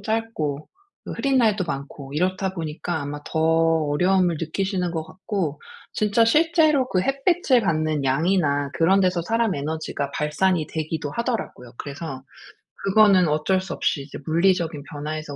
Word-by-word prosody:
짧고 200 -10 -3 0.4
그 - - -6
흐린 275 -1 0
날도 215 -6 +3
많고 140 -2 -6
이렇다 185 +3 0
보니까 160 0 -4
아마 145 +1 -5
더 160 - -4
어려움을 165 +2 +2
느끼시는 180 +2 -1
것 160 -1 -2
같고 185 -6 -4 0.3
진짜 215 +2 +2
실제로 305 0 +3
그 185 - +1
햇빛을 275 - +2
받는 155 -6 0
양이나 145 0 +1
그런 185 +4 +3
데서 180 -2 +2
사람 225 +3 0
에너지가 145 -1 -3
발산이 155 +2 0
되기도 155 -2 -3
하더라고요. 225 - -4
그래서 140 -1 -7 0.6
그거는 195 -3 +5
어쩔 155 +5 +1
수 185 -3 -6
없이 140 - -1
이제 140 - -9
'물리적인 165 -3 +1
변화에서 150 0 -6
170 Hz, 330 characters per minute, -23 LUFS, 150-195 Hz, 0.6 s, 그거는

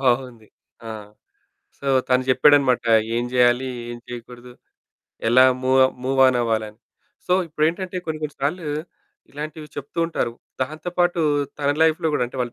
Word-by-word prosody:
బావుంది. 125 -4 -1 0.4
ఆ! - - -5 0.9
సో 140 - -4 0.2
తను 125 0 +3
జెప్పాడనమాట. 130 -1 +4 0.3
ఏం 120 - 0
జేయాలి? 125 +1 +3 0.2
ఏం 120 - -7
జేయకూడదు? 125 0 -10 0.8
ఎలా 125 +2 +6 0.2
మూవ 130 +1 +3 0.2
మూవాన్ 130 -1 +4
అవ్వాలని? 110 -2 -2 0.5
సో 180 - +1
ఇప్పుడేంటంటే, 165 +4 -1
కొన్ని 155 -1 -4
కొన్ని 150 -2 -4
సార్లు 155 +3 -2 0.6
ఇలాంటివి 150 +1 -7
చెప్తూ 145 +4 -6
ఉంటారు. 140 -8 -2 0.3
దాంతో 155 +6 -3
పాటు 175 -1 +2 0.4
తన 140 - +1
లైఫ్‌లో 160 +1 +2
గూడా 125 - +1
అంటే, 130 - -10
వాళ్ళ 120 - -3
130 Hz, 135 wpm, -22 LUFS, 125-155 Hz, 0.9 s, ఎలా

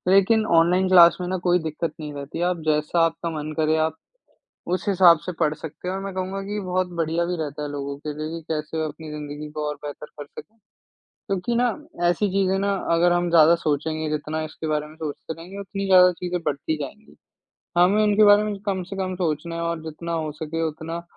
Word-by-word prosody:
लेकिन 215 +3 +4
online 180 +3 +3
class 175 -2 +8
में 180 - -3
ना 185 +1 -1
कोई 175 0 +4
दिक्कत 160 0 -3
नहीं 150 -1 -6
रहती। 140 +3 -6
आप 175 - -4
जैसा 150 +2 +1
आपका 165 +1 -3
मन 150 +1 -5
करे, 155 0 +2
आप 160 0 0 0.8
उस 185 - -3
हिसाब 180 -4 +6
से 180 - -2
पढ़ 155 -2 +2
सकते 160 +3 -8
हो। 190 +1 -2
मैं 195 -1 -6
कहूँगा 190 +1 -3
कि 205 +1 -4
बहुत 185 0 0
बढ़िया 165 +1 0
भी 180 0 -2
रहता 150 -2 -4
है 150 - -3
लोगों 140 -1 -4
के 150 - -2
लिए 155 +1 -4
कि - - -17
कैसे 155 +1 -2
अपनी 155 +1 -7
ज़िंदगी 150 0 -7
को 150 0 -3
और 150 - -2
बेहतर 145 +1 -7
कर 145 - -5
सकें। 215 +9 -13 0.7
क्योंकि 195 +4 -1
न - - +3 0.4
ऐसी 175 +4 +2
चीज़ें 195 0 +2
ना, 200 0 +1 0.2
अगर 175 +1 +4
हम 175 0 +1
ज़्यादा 165 0 +7
सोचेंगे, 155 0 -1
जितना 155 +1 -2
इसके 155 +1 -7
बारे 150 -1 0
में 155 +1 -14
सोचते 155 0 -6
रहेंगे 175 +5 -10
उतनी 195 0 -4
ज़्यादा 180 -1 +7
चीज़ें 180 0 -3
बढ़ती 155 +1 -2
जाएँगी। 210 +10 -10 0.6
हमें 190 +5 +5
इनके 210 0 +5
बारे 205 0 +7
में 210 -1 -2
कम 190 -2 0
से 195 +2 -8
कम 185 -1 -2
सोचना 165 -1 -2
है 170 - -3
और 170 -1 -2
जितना 160 +2 -6
हो 160 -2 -2
सके 160 +2 -4
उतना 160 +2 -6
170 Hz, 215 wpm, -24 LUFS, 155-185 Hz, 0.8 s, class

